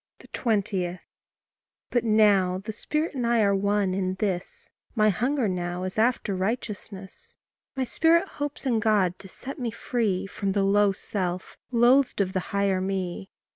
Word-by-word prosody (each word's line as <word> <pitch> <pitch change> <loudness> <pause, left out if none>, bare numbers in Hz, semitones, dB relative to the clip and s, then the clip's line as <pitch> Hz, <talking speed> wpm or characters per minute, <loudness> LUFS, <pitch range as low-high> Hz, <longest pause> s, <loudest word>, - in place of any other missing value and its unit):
20. 190 -6 -1 0.9
But 240 - +2
now 205 -5 +4
the 210 +3 -6
Spirit 305 +8 -2
and 250 -4 -1
I 235 -1 +3
are 200 -1 +3
one 200 -1 +1
in 185 -1 -1
this 190 -2 -4 0.2
My 215 -1 +4
hunger 245 +5 0
now 180 -1 -3
is 185 +3 -3
after 225 -3 +1
righteousness; 200 -1 -5 0.4
My 265 - 0
spirit 330 +8 +3
hopes 290 -3 -5
in 240 -4 +2
God 205 -5 +2
to 195 - -11
set 270 +9 -9
me 245 -2 -1
free 225 -4 -1
From 195 0 -3
the 200 -1 +1
low 200 +1 +4
self 185 -2 -4
loathed 250 +2 +4
of 190 -1 0
the 185 - +1
higher 200 -2 +1
me. 190 0 -3
205 Hz, 155 wpm, -26 LUFS, 190-235 Hz, 0.9 s, now